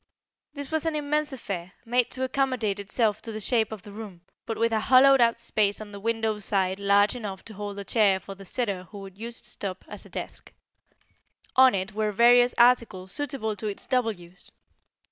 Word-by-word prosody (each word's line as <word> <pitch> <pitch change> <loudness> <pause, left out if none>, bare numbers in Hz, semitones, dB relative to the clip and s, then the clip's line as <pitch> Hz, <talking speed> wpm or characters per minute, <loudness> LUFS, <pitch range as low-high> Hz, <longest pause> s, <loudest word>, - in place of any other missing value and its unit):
This 285 -1 -7
was 315 0 0
an 320 - -1
immense 300 0 0
affair, 190 -8 -6
made 245 +1 +2
to 260 - -5
accommodate 255 -6 0
itself 210 +1 0
to 230 - -6
the 215 - -5
shape 220 0 +2
of 215 -4 -7
the 205 - -11
room, 200 -4 -9 0.3
but 225 - -3
with 230 0 +1
a 220 - +2
hollowed 260 +3 +6
out 230 -1 +3
space 205 -1 +1
on 215 -1 -9
the 200 - -8
window 225 0 -1
side 195 -2 0
large 200 +2 +3
enough 200 -5 -6
to 225 - -11
hold 205 0 -6
a 200 - -4
chair 200 -3 +3
for 195 - -9
the 195 0 -13
sitter 195 -2 -2
who 205 - -12
would 195 -1 -10
use 230 +3 -6
its 240 - -2
top 190 -2 -6
as - - -9
a - - -15
desk. - - -7 1.0
On 260 -3 +6
it 190 +2 -3
were 215 0 0
various 245 +3 +5
articles 235 -6 +3
suitable 265 -6 -2
to 215 - -4
its 205 - -3
double 250 -3 +1
use. 175 -2 -8
220 Hz, 205 wpm, -26 LUFS, 200-245 Hz, 1.0 s, hollowed